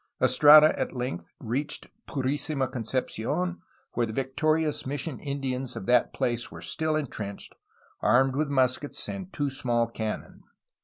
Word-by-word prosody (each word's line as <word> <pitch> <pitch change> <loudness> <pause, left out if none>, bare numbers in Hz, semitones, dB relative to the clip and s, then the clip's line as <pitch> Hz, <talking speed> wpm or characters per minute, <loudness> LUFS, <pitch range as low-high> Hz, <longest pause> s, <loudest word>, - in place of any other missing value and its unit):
Estrada 150 +1 +8
at - - -2
length 125 -9 -4
reached 135 +6 -3 0.2
Purisima 140 0 -1
Concepci6n, 130 - -2 0.3
where 120 -1 0
the - - -5
victorious 150 +5 0
mission 145 +1 -4
Indians 135 -2 -3
of - - -6
that 125 0 +3
place 120 -1 -1
were 85 - -9
still 155 - -1
entrenched, 110 -9 -5 0.5
armed 130 +4 +4
with 150 0 0
muskets 130 +1 0
and 195 -1 -6
two 145 -2 -1
small 120 -3 +1
cannon. 110 -2 -5
130 Hz, 135 wpm, -27 LUFS, 120-150 Hz, 0.5 s, Estrada